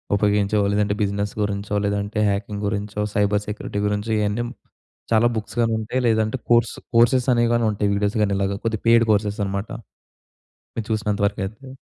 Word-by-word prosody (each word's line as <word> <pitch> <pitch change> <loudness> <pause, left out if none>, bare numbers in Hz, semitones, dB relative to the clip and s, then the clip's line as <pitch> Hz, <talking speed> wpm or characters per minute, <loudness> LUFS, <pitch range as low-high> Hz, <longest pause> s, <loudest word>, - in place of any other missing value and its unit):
ఉపయోగించేవో, 105 0 +2
లేదంటే 105 0 +1
బిజినెస్ 100 0 -2
గురించో, 105 0 -2
లేదంటే 100 +1 -1
హ్యాకింగ్ 100 +1 -3
గురించో, 105 0 -3
సైబర్ 105 -1 +2
సెక్యూరిటీ 105 -1 -4
గురించో, 105 +2 -2
ఇయన్నీ 105 +3 0
హ్మ్, 120 - -7 0.6
చాలా 115 +1 +5
బుక్స్ 110 +1 -5
గానుంటాయి, 115 +2 0
లేదంటే 110 +2 +1
కోర్స్ 120 -1 +3 0.2
కోర్సెస్ 120 +2 +4
అనేయి 120 -1 +2
గానుంటాయి. 110 -3 +1
వీడియోస్ 100 +1 0
గానీ 100 -1 +2
ఇలాగా, 100 0 0
కొద్దిగా 110 -2 -1
పెయిడ్ 115 0 +6
కోర్సెస్ 105 0 0
అనమాట. 100 +2 -3 1.1
మీరు 115 -2 -3
చూసినంత 105 -1 -1
వరకయితే. 105 +5 -5
105 Hz, 150 wpm, -22 LUFS, 100-110 Hz, 1.1 s, పెయిడ్